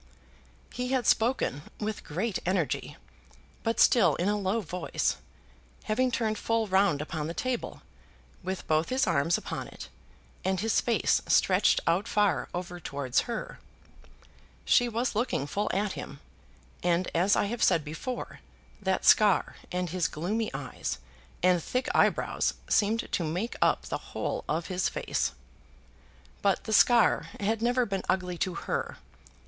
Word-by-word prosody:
He 250 0 -3
had 255 -2 +1
spoken 225 - +2 0.2
with 215 0 -3
great 185 +6 -2
energy, 180 -4 -1 0.6
but 225 0 -1
still 230 -7 +5
in 175 - -1
a 205 - +2
low 205 +2 0
voice, 180 - -2 0.7
having 255 +4 +1
turned 220 -3 -1
full 225 -1 +1
round 190 -6 +2
upon 155 -1 -4
the 165 - -5
table, 255 -1 -3 0.6
with 190 +1 -4
both 155 +1 +1
his 260 +1 +2
arms 170 -2 +2
upon - - -5
it, - - -10 0.5
and 190 -1 0
his 220 0 +2
face 235 - +2
stretched - - +4
out 175 +5 +1
far 205 -4 +1
over 175 0 -5
towards 140 - -1
her. 235 - -5 1.1
She 245 -1 +4
was 235 +2 -1
looking 225 - 0
full 200 +8 -2
at 200 +1 0
him; - - -8 0.6
and, 175 +1 +1
as 185 +4 +3
I - - +2
have 230 +4 -4
said 160 -3 +3
before, 200 - -5 0.4
that 190 -1 0
scar 210 -3 +5
and 180 -2 -2
his 180 -2 +1
gloomy 210 +8 -2
eyes - - -4 0.5
and 180 -1 +4
thick 255 +9 -2
eyebrows - - +2
seemed 220 +2 +1
to 175 - 0
make 180 +9 -2
up - - +3
the - - -4
whole - - -4
of 165 +3 0
his 185 -1 0
face. - - -1 1.1
But - - +2
the 220 - -3
scar 235 +1 +5
had 220 +2 0
never 245 +1 +2
been 195 -3 -2
ugly 180 -2 0
to 185 -2 -1
her. - - -3
195 Hz, 150 wpm, -28 LUFS, 175-225 Hz, 1.1 s, still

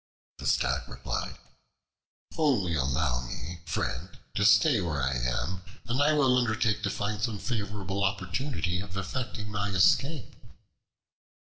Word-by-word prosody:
The - - -4
Stag - - +1
replied: - - -4 1.0
"Only 125 - +2
allow 65 -2 +1
me, 80 +7 -6
friend, 80 +1 -2 0.2
to 100 - +1
stay 120 +2 +6
where 80 -5 -1
I 65 0 +1
am, 65 +9 -1 0.2
and 120 +4 0
I 150 +2 +4
will 130 -4 +4
undertake 110 -2 +1
to 105 - 0
find 105 +1 -2
some 110 -2 -1
favorable 100 -4 -2
opportunity 95 - -1
of 95 -1 -7
effecting 105 +2 -4
my 100 -1 -1
escape." 125 - +2
100 Hz, 130 wpm, -29 LUFS, 85-115 Hz, 1.0 s, stay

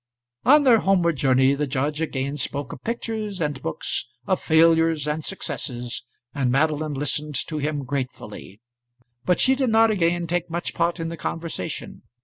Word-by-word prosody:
On 290 +4 +7
their 245 -5 +6
homeward 180 -5 +2
journey 130 0 +4
the 145 +1 -1
judge 145 +3 -1
again 140 -3 -2
spoke 140 -1 -3
of - - -11
pictures 220 -4 -3
and 145 -4 -2
books, 80 - -3 0.2
of - - 0
failures 165 -1 +4
and 150 +1 -2
successes, 125 -11 -3 0.3
and 135 -3 0
Madeline 150 +2 +1
listened 145 +1 -1
to 155 -2 -4
him 145 -1 -2
gratefully. 125 -6 -6 0.6
But 180 - +2
she 265 - +5
did 265 -2 0
not 225 0 +5
again 175 -3 +1
take 175 +1 -2
much 170 +2 -3
part 170 0 0
in 165 0 -3
the 170 - -6
conversation. 165 -2 -5
155 Hz, 160 wpm, -24 LUFS, 140-175 Hz, 0.6 s, On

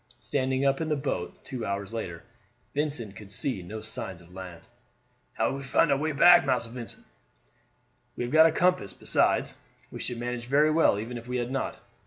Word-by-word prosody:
Standing 130 +2 0
up 135 +2 +2
in 160 - -2
the 150 - +2
boat 135 -11 -4
two 130 -4 -5
hours 100 0 -3
later, 90 -7 -5 0.5
Vincent 140 -9 -2
could 100 -2 -10
see 105 0 -2
no 110 +5 -7
signs 95 -4 -2
of 85 +1 -17
land. 90 -3 -9 0.7
"How - - +1
shall 135 - -3
we 140 - -7
find 140 +5 +3
our 140 - +3
way 155 +1 0
back, 175 +4 +7
Massa 115 -6 0
Vincent?" 120 -2 -8 1.1
"We - - -3
have 120 - -4
got 160 +1 +8
a - - +2
compass; 170 - +2
besides, - - +2 0.3
we - - -7
should 120 - -4
manage 120 0 -4
very 150 +4 +4
well 155 -9 +4
even 120 +3 -5
if 115 - -14
we 125 0 -2
had 120 +1 -2
not. 135 - -3
125 Hz, 200 wpm, -28 LUFS, 105-140 Hz, 1.1 s, got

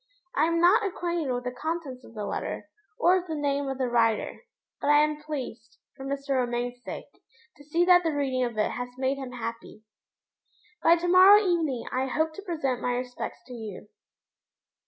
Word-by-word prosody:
I 300 - +4
am 335 +1 +1
not 360 +6 +5
acquainted 345 -6 -2
with 245 0 -2
the 250 - -3
contents 280 -2 -4
of 230 - -15
the 210 -1 -4
letter, - - -4 0.3
or 360 +2 +4
with 360 - -10
the 320 - -3
name 285 -1 -1
of 270 - -3
the 260 -1 0
writer; 230 -2 +1 0.4
but 285 - -2
I 295 - +7
am 300 0 -1
pleased, 255 -7 -6 0.2
for 270 - -9
Mr. 275 0 -2
Romayne's 245 0 -2
sake, - - -9 0.4
to 290 - -15
see 330 +4 +1
that 355 0 +7
the 330 - 0
reading 275 -4 0
of 240 -3 -3
it 210 - +1
has 245 0 -4
made 265 +1 0
him 260 -2 -6
happy. 230 -2 -7 1.0
By 335 +1 +6
to 345 +1 -2
morrow 375 +3 +8
evening 330 - 0
I 260 +1 0
hope 315 +4 0
to 400 - -8
present 305 - -2
my 245 - 0
respects 250 0 -5
to 250 - -10
you. 215 -3 -8
275 Hz, 195 wpm, -27 LUFS, 245-330 Hz, 1.0 s, morrow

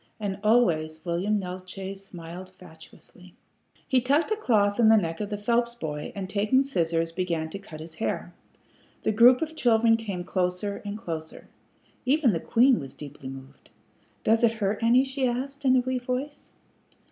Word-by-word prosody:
And 200 -2 -3
always 160 -9 +2
William 185 +5 0
Neeltje 185 +1 -6
smiled 180 -1 -9
fatuously. 180 +1 -16 0.5
He 260 -2 +3
tucked 285 - +2
a - - +3
cloth 210 - +1
in 225 -2 +6
the 220 - +7
neck 165 -3 -2
of 205 - -3
the 205 - -3
Phelps 235 +3 0
boy, 150 -8 -5
and 195 -2 -4
taking 215 +7 +2
scissors, 165 -10 0
began 165 -2 -2
to 195 - -6
cut 160 -6 -11
his 160 +1 -8
hair. 220 - -3 0.7
The - - +2
group 245 +5 +6
of 320 0 -6
children 230 -4 +4
came 200 -6 -5
closer 185 +2 -2
and 205 0 -5
closer. 160 -7 -7 0.5
Even 270 -1 +3
the 165 - -1
queen 245 +8 +4
was 135 -3 -8
deeply 140 -2 -9
moved. 135 +1 -12 0.5
"Does 225 +2 +3
it 230 -1 +4
hurt 210 -1 -2
any?" 240 +3 +5
she 265 -1 -1
asked, 275 +3 -4
in 260 -1 +5
a 255 - +4
wee 255 0 -2
voice. 255 +4 -5
205 Hz, 170 wpm, -26 LUFS, 170-245 Hz, 0.7 s, the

